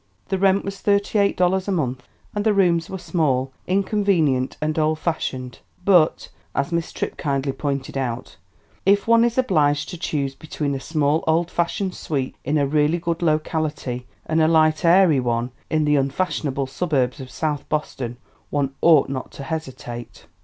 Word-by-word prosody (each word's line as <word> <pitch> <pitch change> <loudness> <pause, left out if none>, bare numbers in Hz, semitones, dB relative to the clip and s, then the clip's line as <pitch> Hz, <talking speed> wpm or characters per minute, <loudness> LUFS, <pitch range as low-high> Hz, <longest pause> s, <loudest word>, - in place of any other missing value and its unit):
The 190 -1 0
rent 195 0 +3
was 195 0 -5
thirty 200 +1 +1
eight 200 0 +2
dollars 185 +1 +2
a - - 0
month. 130 -8 -2 0.3
And 205 - -1
the 215 -1 +3
rooms 170 -4 +2
were 190 - -4
small, 155 -7 0 0.2
inconvenient 185 -9 +1
and 155 +1 -1
old 155 0 +2
fashioned. 130 -6 -3 0.3
"But," 175 -5 +4 0.3
as 140 +5 0
Miss 170 0 -1
Tripp - - -4
kindly 140 -2 -1
pointed 140 -1 -3
out, 125 -5 -3 0.5
"if 200 +2 +3
one 230 0 +6
is 235 0 +1
obliged 150 - +2
to 175 - -7
choose 140 -5 -2
between 145 0 -4
a 135 - -2
small, 150 +1 0
old 165 +2 +2
fashioned 180 +2 -1
suite 135 -7 -3
in 150 +3 0
a 145 - +2
really 150 +3 +2
good 170 0 -2
locality 155 -6 -1 0.2
and 160 0 +1
a 155 - +5
light 155 0 +3
airy 170 -4 +5
one 120 0 -1 0.2
in 155 -1 +1
the 150 0 +3
unfashionable 140 -1 -1
suburbs 135 -3 -1
of 130 - -9
South 150 0 -3
Boston 130 -5 -3 0.3
one 140 -2 -1
ought 160 -4 +6
not 130 -1 -4
to 140 - -8
hesitate." 130 - -6
155 Hz, 170 wpm, -22 LUFS, 135-175 Hz, 0.5 s, one